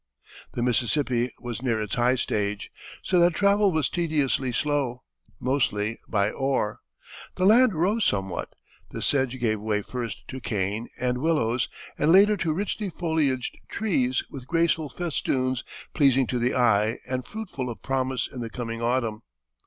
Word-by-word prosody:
The 120 - -1
Mississippi 125 0 +1
was 120 -1 -5
near 120 -4 0
its 105 -2 -3
high 125 +1 +3
stage, 105 -4 -2 0.3
so 180 - +2
that 175 -1 +4
travel 200 0 +4
was 155 -5 +1
tediously 150 -6 0
slow, 135 -2 -1 0.4
mostly 115 -4 0
by 100 -1 +1
oar. 135 -6 -1 0.6
The 185 - +1
land 225 0 +6
rose 200 +8 +2
somewhat, 95 -3 -1 0.4
the - - -5
sedge 130 -2 +1
gave 110 -3 +1
way 105 -1 0
first 120 -4 -5
to 130 - -6
cane 105 +2 -2
and 125 0 0
willows, 130 -6 +1 0.3
and 150 +2 +4
later 205 +3 +7
to 170 -3 0
richly 200 +4 -2
foliaged 155 -7 -1
trees 130 - 0
with 130 -2 -9
graceful 165 -2 +1
festoons 130 -7 -1 0.3
pleasing 135 -3 +4
to 125 0 -2
the 120 +2 +1
eye 115 -3 +3
and 130 -1 -3
fruitful 185 - -5
of 115 - -8
promise 130 -2 -1
in 130 - -9
the 115 - -4
coming 115 -1 -5
autumn. 115 -3 0
130 Hz, 155 wpm, -26 LUFS, 115-160 Hz, 0.6 s, later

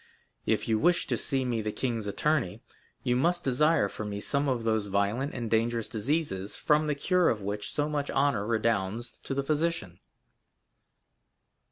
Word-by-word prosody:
If - - +1
you 110 -1 +2
wish 175 +5 +3
to - - 0
see 135 -2 -1
me 120 -3 0
the 105 0 -2
king's 115 -3 -2
attorney, 135 - 0 0.4
you 125 - +2
must 175 +7 +1
desire 145 -1 +3
for 110 - -6
me 105 -1 -4
some 140 +6 0
of 125 -3 -1
those 110 -2 +1
violent 100 +8 0
and 120 -2 -3
dangerous 115 0 +1
diseases 110 - -1
from 150 +1 +2
the 150 - +1
cure 180 +4 +3
of 105 -3 -1
which 100 +1 -3
so 145 0 0
much 145 -2 -2
honor 135 -7 +1
redounds 115 0 -1
to 135 - -4
the 140 - 0
physician." 150 - -1
120 Hz, 170 wpm, -29 LUFS, 105-145 Hz, 0.4 s, wish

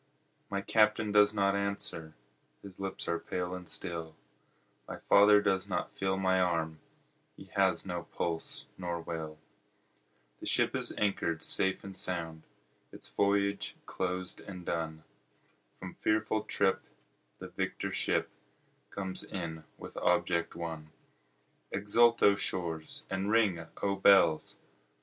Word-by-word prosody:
My 100 0 -1
Captain 105 0 +3
does 105 0 +6
not 100 -2 +2
answer, 100 -5 -3 0.5
his 95 -2 -11
lips 95 0 -4
are 85 0 0
pale 90 0 -3
and 90 -2 -6
still, 80 -1 -4 0.7
My - - -6
father 105 0 +6
does 95 -2 +1
not - - -2
feel 95 -1 0
my 95 -1 +2
arm, 80 -3 0 0.6
he - - -13
has 95 -3 +2
no 90 -2 -3
pulse 85 -1 -4
nor 85 -2 -2
will, 80 -2 -5 1.0
The - - -6
ship - - +2
is - - 0
anchor'd 95 -5 0
safe 95 0 0
and 95 -1 -8
sound, 85 -4 -3 0.5
its - - -4
voyage 100 0 +1
closed 90 0 -3
and 90 -2 -9
done, 80 -1 -3 0.7
From 95 -1 -8
fearful 110 0 0
trip 95 -1 +1 0.6
the - - -8
victor - - -3
ship - - +1 0.6
comes 95 -1 -4
in 80 -4 -6
with - - -10
object 85 -1 +1
won; 80 -2 -5 0.8
Exult 115 +3 +4
O 100 - +8
shores 85 -5 -3
and 95 +1 -1
ring 100 -7 +2 0.2
O 100 -1 +1
bells! 95 -5 +5
95 Hz, 130 wpm, -31 LUFS, 85-100 Hz, 1.0 s, O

